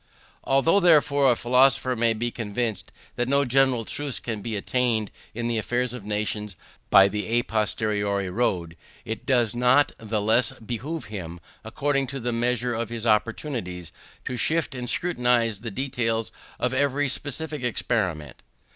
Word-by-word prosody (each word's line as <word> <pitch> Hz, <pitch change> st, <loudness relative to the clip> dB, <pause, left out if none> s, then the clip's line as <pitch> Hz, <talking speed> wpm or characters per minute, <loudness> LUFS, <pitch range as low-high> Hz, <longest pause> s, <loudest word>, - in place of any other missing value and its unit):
Although, 135 Hz, +8 st, +3 dB
therefore, 145 Hz, -6 st, +4 dB
a -, -, +2 dB
philosopher 130 Hz, +2 st, +3 dB, 0.2 s
be 120 Hz, +2 st, -2 dB
convinced 115 Hz, -1 st, -3 dB, 0.3 s
that 120 Hz, +1 st, 0 dB
no 140 Hz, +1 st, +3 dB
general 130 Hz, -2 st, +2 dB
truths 145 Hz, +1 st, -3 dB
can 110 Hz, -3 st, -5 dB
be 110 Hz, +1 st, -4 dB
attained 115 Hz, 0 st, 0 dB, 0.2 s
in 120 Hz, 0 st, -2 dB
the 115 Hz, -1 st, 0 dB
affairs 120 Hz, +2 st, -1 dB
of 125 Hz, -5 st, -7 dB
nations 105 Hz, -1 st, -3 dB, 0.3 s
by 95 Hz, 0 st, +7 dB
the 105 Hz, +1 st, -3 dB
à 120 Hz, -, -3 dB
posteriori 105 Hz, -2 st, -1 dB
road, 90 Hz, -5 st, -1 dB, 0.3 s
it 110 Hz, +3 st, -6 dB
does 120 Hz, -5 st, +2 dB
not 125 Hz, +4 st, +4 dB
the 110 Hz, -1 st, -2 dB
less 110 Hz, +5 st, +2 dB
behove 130 Hz, +7 st, -5 dB
him, 85 Hz, -3 st, -6 dB, 0.2 s
according 140 Hz, +4 st, -1 dB
to 135 Hz, 0 st, -5 dB
the 120 Hz, -1 st, -2 dB
measure 120 Hz, +1 st, 0 dB
of 115 Hz, -1 st, -3 dB
his 115 Hz, -1 st, -5 dB
opportunities, 110 Hz, -, -1 dB, 0.3 s
to 125 Hz, -, -3 dB
sift 160 Hz, +5 st, 0 dB
and 125 Hz, -2 st, -4 dB
scrutinize 125 Hz, -, +1 dB
the 115 Hz, -, -4 dB
details 115 Hz, -1 st, -1 dB, 0.3 s
of 125 Hz, 0 st, -1 dB
every 140 Hz, +1 st, +1 dB
specific 150 Hz, +2 st, -2 dB
experiment. 95 Hz, -, -2 dB
120 Hz, 150 wpm, -25 LUFS, 110-130 Hz, 0.3 s, by